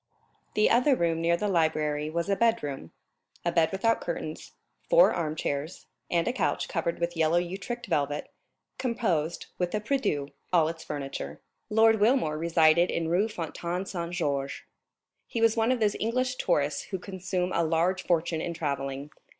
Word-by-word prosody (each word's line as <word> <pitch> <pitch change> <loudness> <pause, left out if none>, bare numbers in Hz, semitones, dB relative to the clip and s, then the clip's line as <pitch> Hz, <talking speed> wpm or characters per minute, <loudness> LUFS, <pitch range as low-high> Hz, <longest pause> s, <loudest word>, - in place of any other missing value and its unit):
The 215 - +4
other 255 +3 +4
room 165 -5 0
near 170 +1 +3
the 210 - -1
library 155 -4 +1
was 170 +2 -2
a 200 - +2
bedroom. 150 - 0 0.5
A 170 - +2
bed 165 -2 +3
without 225 +4 +1
curtains, 155 -2 -5 0.4
four - - +6
armchairs, 155 -1 -3 0.2
and 170 -1 +1
a 245 - +1
couch, - - 0
covered 170 -1 -2
with 170 0 -2
yellow 165 +1 +3
Utrecht 190 +7 -3
velvet, 145 -5 -1 0.5
composed, 200 - -1
with 180 +2 0
a - - +1
prie 250 +7 0
Dieu, 145 - -1 0.2
all 165 -3 +4
its 165 0 -7
furniture. 135 - -5 0.3
"Lord 225 0 +5
Wilmore 210 - +2
resided 165 +1 +4
in 165 -1 -1
Rue 185 +6 +2
Fontaine 175 -1 -4
Saint 170 -2 -4
Georges. 140 -5 -2 0.6
He 230 - -3
was 225 0 +4
one 225 +1 +2
of 255 - +1
those 210 -2 +2
English 255 +3 0
tourists 145 0 0
who 190 - -4
consume 185 -1 -3
a 170 - +2
large 165 +3 +1
fortune 165 -2 0
in 170 0 -3
travelling. 140 -2 -3
170 Hz, 165 wpm, -28 LUFS, 155-210 Hz, 0.6 s, four